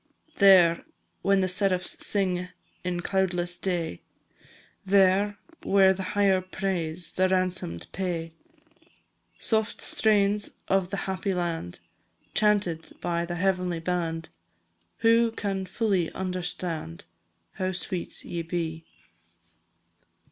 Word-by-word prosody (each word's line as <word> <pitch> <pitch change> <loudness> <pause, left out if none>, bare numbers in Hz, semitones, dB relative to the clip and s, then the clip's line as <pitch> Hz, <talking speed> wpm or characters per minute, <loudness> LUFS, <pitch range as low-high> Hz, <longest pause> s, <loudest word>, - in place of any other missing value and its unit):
There, 185 -4 +6 0.4
when 195 -1 +3
the 185 - +2
seraphs 185 -1 +1
sing, 180 -3 +1 0.4
In 180 -1 -2
cloudless 175 -2 0
day; 170 - -2 0.8
There, 195 +1 +3 0.2
where 195 -1 +5
the 190 - -6 0.2
higher 195 -2 +4
praise 180 -3 -3
The 185 0 +2
ransom'd 185 - -1
pay. 170 -4 -3 1.0
Soft 220 -1 0
strains 205 -1 +2
of 190 -2 +1
the 200 - -3
happy 190 0 -2
land, 165 - -3 0.5
Chanted 205 -6 +1
by 170 0 -1
the 175 - -3
heavenly 180 -1 0
band, 165 -1 -2 0.8
Who 230 +1 +5
can 195 -3 -3
fully 190 -4 0
understand 175 - -4 0.5
How 185 0 0
sweet 180 -1 -4
ye 170 - -3
be! 165 -1 -4
185 Hz, 105 wpm, -27 LUFS, 175-195 Hz, 1.0 s, There